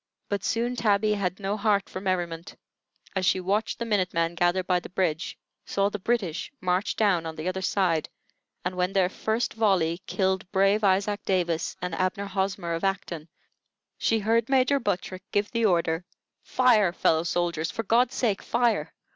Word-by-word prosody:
But 200 -1 -2
soon 240 +2 0
Tabby 210 -2 +2
had 190 -2 -2
no 200 +1 -1
heart 205 -2 +1
for 185 - -7
merriment, 175 -3 -2 0.6
as 190 - 0
she 185 +1 +3
watched 200 +4 -1
the 235 - -3
minute 200 -6 0
men 165 0 +1
gather 175 +2 +1
by 180 0 +1
the - - -10
bridge, 175 -3 -1 0.3
saw 200 0 0
the 210 - -5
British 190 -6 -1
march 185 0 0
down 185 -6 +2
on 160 - -6
the 155 +3 -5
other 185 +1 -2
side, 180 -4 +1 0.6
and 180 - -1
when 180 +1 0
their 185 -2 +3
first 220 +4 -1
volley 185 -6 +1
killed 190 -1 -1
brave 195 +2 +3
Isaac 200 +1 +2
Davis 170 -4 0
and 180 -2 -2
Abner 185 +3 -1
Hosmer, 190 -3 -2
of 165 - -3
Acton, 175 -4 -2 0.7
she 225 - +2
heard 225 +2 +1
Major 270 +1 +3
Buttrick 185 -4 -2
give 205 0 0
the 230 -1 +1
order, 170 -3 +2 0.4
"Fire, 225 -8 +3
fellow 160 -2 +2
soldiers; 170 -1 -1
for 225 - -3
God's 240 +4 +2
sake, 215 -6 0
fire!" 240 -1 0
190 Hz, 170 wpm, -26 LUFS, 175-210 Hz, 0.7 s, she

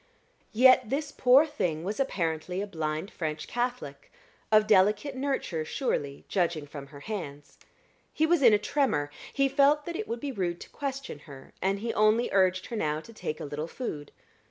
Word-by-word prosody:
Yet 255 0 +5
this 290 +2 -2
poor 260 +4 +5
thing 165 - -2
was 205 +6 -4
apparently 180 - -1
a 200 - -1
blind 160 -1 -3
French 155 -2 -4
Catholic 240 - -4 0.4
of 215 -1 +6
delicate 210 +6 +3
nurture, 260 - -2
surely, 145 - -3
judging 170 -5 0
from 140 -1 -9
her 140 0 -13
hands. 145 -8 -7 0.5
He 315 - +1
was 335 -1 +3
in 240 -4 +7
a 210 - +5
tremor; 205 - 0 0.2
he 275 -1 +2
felt 285 +2 +3
that 340 - -5
it 435 - -4
would 230 - -3
be 280 +2 -4
rude 180 -7 -2
to - - -11
question 275 - -5
her, 135 -1 -12
and 195 +1 0
he 230 0 -2
only 215 +3 +3
urged 185 -1 +2
her 235 - -6
now 155 -7 -1
to 230 +8 -13
take 155 -7 -5
a - - -5
little 150 +2 -4
food. 155 - -6
205 Hz, 180 wpm, -28 LUFS, 155-260 Hz, 0.5 s, in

